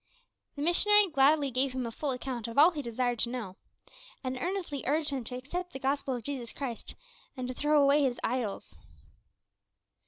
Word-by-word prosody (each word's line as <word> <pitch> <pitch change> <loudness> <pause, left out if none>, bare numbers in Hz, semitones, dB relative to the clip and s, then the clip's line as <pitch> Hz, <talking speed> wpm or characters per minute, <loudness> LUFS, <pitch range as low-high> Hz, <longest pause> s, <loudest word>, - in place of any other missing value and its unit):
The 285 - -4
missionary 410 +4 +5
gladly 280 -1 +3
gave 255 +1 +1
him 255 -1 -2
a 230 - -4
full 290 +5 -3
account 250 -3 -4
of 230 - -7
all 310 +5 +8
he 305 -4 -4
desired 245 -1 -1
to 235 - +1
know, 230 -7 -5 0.7
and 260 0 -2
earnestly 340 -1 -3
urged 300 +1 +2
him 265 -3 -3
to 250 - -6
accept 350 +8 -5
the 265 - -6
Gospel 270 0 -1
of 240 - -6
Jesus 255 -2 -5
Christ, 250 -5 -6 0.4
and 255 -1 -3
to 255 - -4
throw 295 +3 +2
away 285 +1 +5
his 260 -3 0
idols. 225 - -3
270 Hz, 185 wpm, -30 LUFS, 250-295 Hz, 0.7 s, all